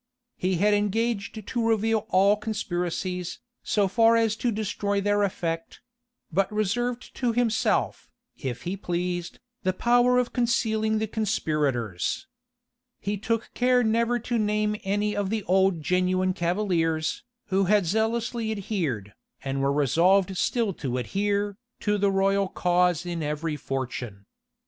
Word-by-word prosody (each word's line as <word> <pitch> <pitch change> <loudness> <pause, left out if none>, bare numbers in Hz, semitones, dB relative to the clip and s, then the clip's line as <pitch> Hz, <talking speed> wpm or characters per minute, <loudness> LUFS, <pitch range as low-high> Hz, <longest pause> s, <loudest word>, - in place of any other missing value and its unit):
He 185 +1 0
had 205 +4 +3
engaged 210 0 -1
to 235 +1 -2
reveal 220 -1 +1
all 195 +2 +5
conspiracies, 180 -4 -3 0.2
so 205 -2 +1
far 225 +4 +4
as 225 -2 +2
to 245 - 0
destroy 205 -1 -1
their 205 +1 +1
effect; 165 -4 -2 0.5
but 190 +4 +1
reserved 235 +4 -1
to 245 -3 +1
himself, 225 -2 0 0.3
if 125 -4 -5
he 180 +3 -2
pleased, 175 -2 -3 0.2
the 185 - 0
power 245 +4 +3
of 250 -1 0
concealing 220 -3 +1
the 220 - 0
conspirators. 150 - -1 0.7
He 205 +1 -2
took 225 +3 -2
care 250 0 +3
never 230 +2 +2
to 240 0 -2
name 210 0 +1
any 205 +2 0
of 205 -2 -1
the 220 -1 -1
old 190 -3 +2
genuine 185 +2 +1
cavaliers, 170 -4 0 0.3
who 195 0 +2
had 205 0 +3
zealously 225 +3 0
adhered, 165 - -3 0.3
and 135 0 -2
were 140 0 +2
resolved 180 +7 +3
still 225 +1 0
to 130 -3 -1
adhere, 200 +7 -1 0.2
to 210 -1 +1
the 200 0 +3
royal 195 0 +2
cause 180 -2 +1
in 170 -2 -3
every 150 +1 -2
fortune. 125 -7 -5
200 Hz, 135 wpm, -26 LUFS, 175-220 Hz, 0.7 s, all